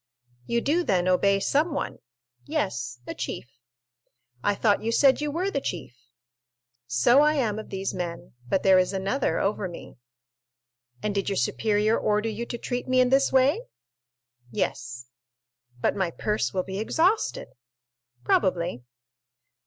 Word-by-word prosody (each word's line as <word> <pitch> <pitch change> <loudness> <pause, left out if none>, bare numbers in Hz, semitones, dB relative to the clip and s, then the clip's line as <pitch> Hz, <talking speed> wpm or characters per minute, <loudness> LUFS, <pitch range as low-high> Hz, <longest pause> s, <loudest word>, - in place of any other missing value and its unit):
"You 235 0 +1
do, 325 +7 +1
then, 185 - +1
obey 195 +2 +3
someone?" 295 - 0 0.5
"Yes, 120 +1 -2
a - - -5
chief." 125 - -5 1.0
"I 205 - +2
thought 205 0 +2
you 225 +1 -1
said 270 +4 +4
you 300 - -1
were 355 +6 -1
the 280 - -1
chief?" 170 - -5 0.9
"So 125 - +4
I 300 +1 +4
am 220 -7 0
of 215 - -9
these 195 0 -3
men; 175 -2 -5 0.2
but 190 - +1
there 190 -1 +6
is 185 +1 +1
another 195 +8 0
over 200 -1 -1
me." 175 -5 -10 1.1
"And 210 - 0
did 200 0 -1
your 200 - -1
superior 210 - +1
order 210 +1 +1
you 225 +2 -5
to 240 - -4
treat 245 +1 -4
me 255 0 +3
in 250 -1 +4
this 275 +1 +4
way?" 270 - +3 0.9
"Yes." 120 +1 -3 0.8
"But - - +1
my 190 -3 0
purse 210 +5 -1
will 185 -2 -1
be 190 +1 -5
exhausted." 345 - +1 0.7
"Probably." 170 - +1
210 Hz, 145 wpm, -26 LUFS, 185-255 Hz, 1.1 s, there